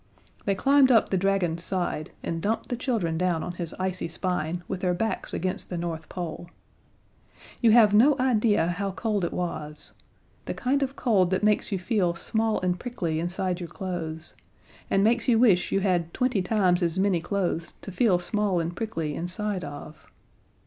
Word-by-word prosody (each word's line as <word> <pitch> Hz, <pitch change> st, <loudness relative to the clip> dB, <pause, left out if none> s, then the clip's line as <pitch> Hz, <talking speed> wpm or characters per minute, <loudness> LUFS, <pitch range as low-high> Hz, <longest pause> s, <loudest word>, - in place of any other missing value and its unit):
They 200 Hz, -, +1 dB
climbed 275 Hz, +3 st, +5 dB
up 225 Hz, -3 st, +4 dB
the -, -, 0 dB
dragon's 180 Hz, -3 st, 0 dB
side 175 Hz, -5 st, -2 dB
and 165 Hz, -1 st, -3 dB
dumped 220 Hz, +4 st, -1 dB
the 245 Hz, -, -1 dB
children 220 Hz, -10 st, -1 dB
down 180 Hz, -3 st, 0 dB
on -, -, -4 dB
his 170 Hz, -1 st, -6 dB
icy 185 Hz, -2 st, -2 dB
spine, 175 Hz, 0 st, -3 dB
with 190 Hz, -, -3 dB
their 180 Hz, -1 st, +1 dB
backs 220 Hz, +5 st, -2 dB
against 185 Hz, +1 st, -3 dB
the 180 Hz, -, -3 dB
North 165 Hz, -2 st, -4 dB
Pole. 175 Hz, -1 st, -6 dB, 1.1 s
You 235 Hz, -, +5 dB
have 220 Hz, -3 st, +6 dB
no 260 Hz, +8 st, +6 dB
idea 225 Hz, -7 st, +2 dB
how 190 Hz, +3 st, -2 dB
cold 210 Hz, -1 st, -1 dB
it 170 Hz, -, -1 dB
was 155 Hz, -4 st, -5 dB, 0.5 s
the -, -, -4 dB
kind 275 Hz, +3 st, 0 dB
of 270 Hz, 0 st, -1 dB
cold 195 Hz, -8 st, +2 dB
that 185 Hz, +2 st, 0 dB
makes 210 Hz, 0 st, +2 dB
you 195 Hz, -, 0 dB
feel 185 Hz, -3 st, 0 dB
small 220 Hz, +5 st, 0 dB
and 180 Hz, -1 st, 0 dB
prickly 175 Hz, -11 st, -3 dB
inside 175 Hz, +1 st, -2 dB
your 175 Hz, -2 st, -6 dB
clothes, 165 Hz, -4 st, -5 dB, 0.6 s
and 195 Hz, -, +3 dB
makes 230 Hz, +3 st, +2 dB
you 240 Hz, -3 st, +4 dB
wish 210 Hz, -7 st, +4 dB
you 195 Hz, -, +2 dB
had 175 Hz, -4 st, 0 dB
twenty 250 Hz, -5 st, +1 dB
times 185 Hz, -2 st, +2 dB
as 170 Hz, 0 st, 0 dB
many 190 Hz, -3 st, +2 dB
clothes 175 Hz, -2 st, -2 dB
to 195 Hz, -, -6 dB
feel 200 Hz, -2 st, +3 dB
small 195 Hz, +1 st, 0 dB
and 170 Hz, +1 st, -3 dB
prickly 165 Hz, -10 st, -3 dB
inside 185 Hz, +4 st, -2 dB
of. 150 Hz, +1 st, -9 dB
185 Hz, 180 wpm, -26 LUFS, 175-215 Hz, 1.1 s, have